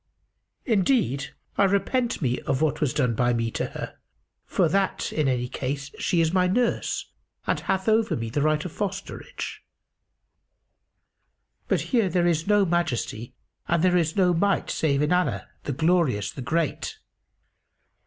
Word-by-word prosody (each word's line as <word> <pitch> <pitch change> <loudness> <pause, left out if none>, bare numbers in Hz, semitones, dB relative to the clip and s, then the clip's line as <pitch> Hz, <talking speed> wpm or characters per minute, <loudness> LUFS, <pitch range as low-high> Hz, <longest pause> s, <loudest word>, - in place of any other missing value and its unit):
Indeed, 195 - +1 0.2
I 200 - +6
repent 215 - 0
me 125 -1 +1
of 130 - +1
what 150 0 0
was 145 -4 +2
done 125 -6 +1
by 120 +2 +2
me 115 -1 -1
to - - -2
her, - - -7 0.5
for 175 - +2
that, 195 +4 0
in 155 -3 +1
any 125 -2 0
case, 140 +2 -4
she 170 - +2
is 160 +1 +1
my 180 -1 +3
nurse 235 +6 0 0.3
and - - 0
hath 190 +1 -1
over 220 0 +3
me 115 -1 -4
the 145 - 0
right 155 +1 +1
of 180 - -4
fosterage. 200 - -5 2.1
But - - +1
there 185 - +2
is 165 -1 +1
no 205 -1 +4
Majesty 125 - -2 0.3
and 170 0 +2
there 180 -1 +4
is 165 -3 +1
no 180 -3 +4
Might 200 +4 +1
save 145 -2 +1
in 150 +4 +2
Allah, 180 0 0 0.2
the - - -1
Glorious, 150 - +1
the 135 - -8
Great!" 160 +3 -1
165 Hz, 155 wpm, -25 LUFS, 140-190 Hz, 2.1 s, I